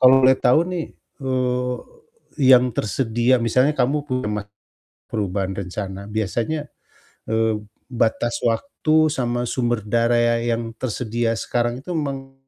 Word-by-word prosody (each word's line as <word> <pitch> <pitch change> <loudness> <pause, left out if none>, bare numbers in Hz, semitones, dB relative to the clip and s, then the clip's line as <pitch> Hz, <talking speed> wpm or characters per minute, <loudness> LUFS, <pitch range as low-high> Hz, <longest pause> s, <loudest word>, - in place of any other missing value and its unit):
kalau 130 0 +8
boleh 130 0 +6
tahu 125 +4 +4
nih, 170 -3 -2 0.3
eee, 125 -1 0 0.6
yang 125 -2 +6
tersedia 120 +3 +1
misalnya 130 +6 +2
kamu 140 +3 +1
pernah 105 -5 -2 0.6
perubahan 95 -2 -2
rencana 100 +1 -5
biasanya, 115 - -2 0.6
eee, 110 -1 +1 0.2
batas 120 -1 0
waktu 155 +5 +2
sama 120 -3 -1
sumber 120 -3 -1
daya 115 +1 +2
yang 115 -1 -2
tersedia 115 -1 -2
sekarang 120 +2 -1
itu 180 - -5
meng 135 -4 -3
120 Hz, 115 wpm, -22 LUFS, 110-130 Hz, 0.6 s, kalau